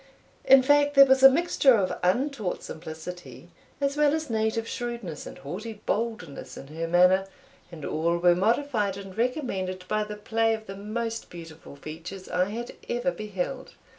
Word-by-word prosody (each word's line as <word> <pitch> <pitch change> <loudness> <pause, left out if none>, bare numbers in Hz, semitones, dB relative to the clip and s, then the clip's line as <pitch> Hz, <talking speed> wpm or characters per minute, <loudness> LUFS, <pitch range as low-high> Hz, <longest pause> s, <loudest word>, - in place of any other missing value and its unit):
In 270 0 +7
fact, 290 +1 +3
there 275 0 +10
was 265 0 +4
a 270 - +11
mixture 275 -3 +4
of 195 -4 0
untaught 220 +1 0
simplicity, 160 -3 -9 0.3
as 280 0 0
well 300 0 +4
as 315 -5 -4
native 220 +1 0
shrewdness 235 - -5
and - - -10
haughty 200 +11 -6
boldness, 215 -10 -3
in 135 - -10
her 165 +2 -4
manner, 180 +3 +4 0.4
and 155 -4 -8
all 170 +2 0
were 175 0 +5
modified 210 +1 0
and 195 -1 -9
recommended 195 -8 -2
by 215 0 0
the 210 0 -6
play 225 +1 +1
of 220 0 -10
the 195 - -8
most 225 +3 -4
beautiful 165 -4 -11
features 165 +6 -9
I 180 0 +1
had 230 +4 -5 0.2
ever 245 +3 0
beheld. 215 +5 -5
210 Hz, 165 wpm, -26 LUFS, 180-245 Hz, 0.4 s, a